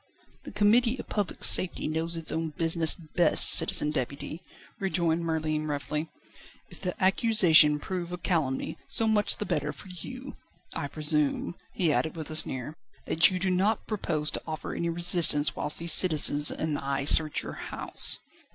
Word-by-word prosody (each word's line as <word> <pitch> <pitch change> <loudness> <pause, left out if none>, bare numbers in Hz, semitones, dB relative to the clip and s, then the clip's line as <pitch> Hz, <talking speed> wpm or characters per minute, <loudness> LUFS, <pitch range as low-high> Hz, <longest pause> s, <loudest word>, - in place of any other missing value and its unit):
"The - - -9
Committee 230 +4 +2
of - - -9
Public 205 -3 -4
Safety 185 - +4
knows 165 +2 -2
its 165 - -3
own 160 0 -3
business 165 -1 +1
best, 170 -1 +3
Citizen 150 - +5
Deputy," 140 +4 -5 0.4
rejoined 170 -4 -1
Merlin 155 -2 -3
roughly. 150 +2 -4 0.6
"If - - -15
the 180 -2 -5
accusation 185 -7 +4
prove 175 +2 -6
a 180 - -5
calumny, 160 -7 -3
so 225 - +2
much 210 -1 0
the 210 - -5
better - - -2
for 195 - -13
you. 255 - -10 0.4
I 145 -3 -4
presume," 150 +2 -1 0.2
he 165 -5 +1
added 160 +2 -2
with 160 -2 -7
a - - -4
sneer, 135 0 +1 0.3
"that 160 0 +3
you 185 - -3
do 185 +1 -2
not 195 +5 0
propose 155 -8 -3
to - - -6
offer 155 -1 -6
any 170 - -3
resistance 170 -3 0
whilst 150 - -2
these 170 0 +1
citizens 150 -4 +3
and 155 -2 -3
I 140 0 -3
search 155 +1 +5
your - - -8 0.2
house." - - +2
165 Hz, 165 wpm, -27 LUFS, 150-185 Hz, 0.6 s, Citizen